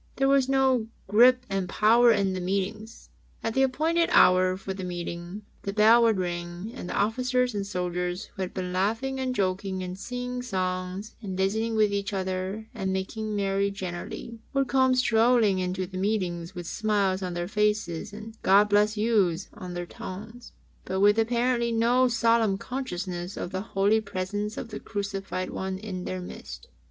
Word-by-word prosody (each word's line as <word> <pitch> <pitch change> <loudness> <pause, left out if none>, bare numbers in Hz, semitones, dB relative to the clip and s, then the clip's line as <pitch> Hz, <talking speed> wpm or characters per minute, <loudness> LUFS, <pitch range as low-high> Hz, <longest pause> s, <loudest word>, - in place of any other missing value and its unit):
There 270 - +2
was 275 -1 +3
no 265 -4 +3 0.2
grip 250 +5 +5
and 195 -2 -2
power 235 +3 +5
in 200 -3 +2
the 185 - -3
meetings. 200 +4 -3 0.3
At 225 - -1
the 265 - +2
appointed 320 +6 +2
hour 185 0 +5
for 190 0 -5
the 190 0 -6
meeting, 175 +2 -5 0.2
the 200 - -4
bell 220 +3 +6
would 225 -3 +4
ring 175 +2 -4
and 210 -9 -7
the - - -3
Officers 250 +3 +1
and 200 -1 -3
Soldiers 180 0 -2
who 195 - -7
had 185 - -2
been 180 -1 -4
laughing 225 +8 0
and 255 -1 -1
joking 190 -1 -1
and 180 0 -5
singing 250 +2 -4
songs, 185 -2 -3
and 190 -4 -5
visiting 220 +4 0
with 210 -2 +3
each 200 0 -2
other 190 +3 -3
and 195 -5 -2
making 210 +3 -3
merry 200 0 +1
generally, 195 +4 -6
would 275 -1 +1
come 260 0 +3
strolling 230 -4 +3
into 185 0 -2
the 185 0 -6
meetings 185 -4 -2
with 175 -1 -6
smiles 200 -1 0
on 180 -2 -3
their 175 0 -2
faces 210 -3 0
and 220 +2 -9
"God 205 +2 +5
bless 210 +1 +3
yous^^ 205 -5 +1
on 180 -4 -8
their 175 0 -3
tongues, 220 +7 -9 0.3
but 190 +1 -2
with 205 +2 +5
apparently 235 +1 +1
no 240 +3 +3
solemn 230 -4 +2
consciousness 185 -7 -5
of 175 - -4
the 185 - -2
holy 205 +1 +2
presence 205 +2 -4
of 230 - -5
the 215 - -6
Crucified 195 -3 -4
One 190 0 -3
in 190 -3 -6
their 185 0 -4
midst. 65 - -9
200 Hz, 175 wpm, -27 LUFS, 185-230 Hz, 0.3 s, bell